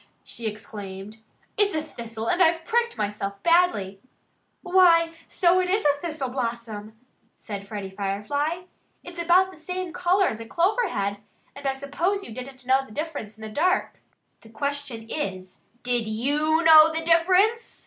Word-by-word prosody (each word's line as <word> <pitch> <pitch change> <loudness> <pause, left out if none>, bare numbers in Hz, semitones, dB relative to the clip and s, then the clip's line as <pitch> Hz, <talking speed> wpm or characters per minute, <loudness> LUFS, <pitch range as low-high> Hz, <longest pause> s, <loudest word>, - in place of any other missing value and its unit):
she 230 -1 -6
exclaimed. 205 -1 -8 0.4
"It's 405 -3 +3
a 310 - -1
thistle 230 -6 -7
and 355 +7 +1
I've 330 -1 +3
pricked 470 0 0
myself 205 -1 -3
badly." 335 - +2 0.6
"Why, 350 -3 +5
so 360 0 +3
it 365 0 0
is 400 0 +1
a 290 0 +2
thistle 310 -6 -3
blossom!" 230 -4 -5 0.4
said 200 -2 -7
Freddie 200 -2 -6
Firefly. 210 - -2 0.4
"It's 350 -1 -7
about 365 +3 +4
the - - -15
same 360 +2 -5
color 360 +2 +2
as 220 - -3
a 225 - -8
clover 405 - +1
head; 200 -6 -2 0.4
and 280 0 -5
I 270 - 0
suppose 330 +9 -2
you - - -9
didn't 255 +1 -9
know 265 +1 +3
the 265 - -16
difference 285 -6 -5
in 220 - -12
the 220 - -6
dark." 360 - 0 0.4
"The 225 - -16
question 275 -2 -4
is, 185 -10 -5 0.2
did 245 -2 0
YOU 295 +9 +1
know 320 -1 +8
the 320 0 -3
difference?" 370 +8 +3
285 Hz, 160 wpm, -25 LUFS, 220-345 Hz, 0.6 s, know